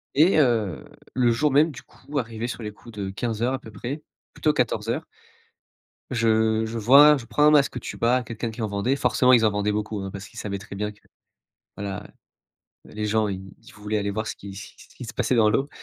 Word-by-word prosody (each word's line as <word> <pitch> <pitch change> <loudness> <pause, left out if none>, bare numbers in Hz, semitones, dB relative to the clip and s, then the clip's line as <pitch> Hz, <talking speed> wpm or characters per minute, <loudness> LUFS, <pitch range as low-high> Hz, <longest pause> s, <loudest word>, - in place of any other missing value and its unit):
et 160 +4 +5
heu, 115 - +1 0.3
le 125 -2 +3
jour 145 +5 +1
même 150 +3 +4
du - - -10
coup 145 +2 -6
arrivé 115 0 -4
sur 120 -2 -6
les 105 - -4
coups 110 +1 -15
de 95 -1 -3
15:00 115 +5 -2
à 130 - -2
peu 110 - -12
près, 130 +9 -5 0.3
plutôt 155 -1 +1
14:00 115 -1 -1 1.0
je 110 -2 +2
je 115 +1 -4
vois 140 +6 +7
je 120 - -9
prends 150 - +1
un 150 - +7
masque 140 -4 +3
tuba 125 +2 0
quelqu'un 115 +1 -4
qui 110 +1 -7
en 110 - 0
vendait 100 +7 0
forcément 130 -2 +3
ils 115 -2 +6
en 105 - +3
vendaient 105 +1 0
beaucoup, 105 0 -3
hein, 95 - -5
parce 100 0 -8
qu'ils - - -10
savaient 100 -1 -3
très 100 0 -10
bien 105 +1 -2
que, 105 - -27 0.8
voilà 100 0 -5 0.8
les 105 0 -5
gens 110 0 +1
ils 95 -1 -6
ils - - -16
voulaient 105 0 -4
aller 100 0 -1
voir 110 +2 -3
ce - - -4
qui 100 -1 -10
ce 100 - -10
qui - - -15
ce - - -20
qui 125 - -9
se - - -8
passait 125 0 +1
dans 110 -2 +5
l'eau. 135 +6 +1
110 Hz, 230 wpm, -24 LUFS, 105-125 Hz, 1.0 s, vois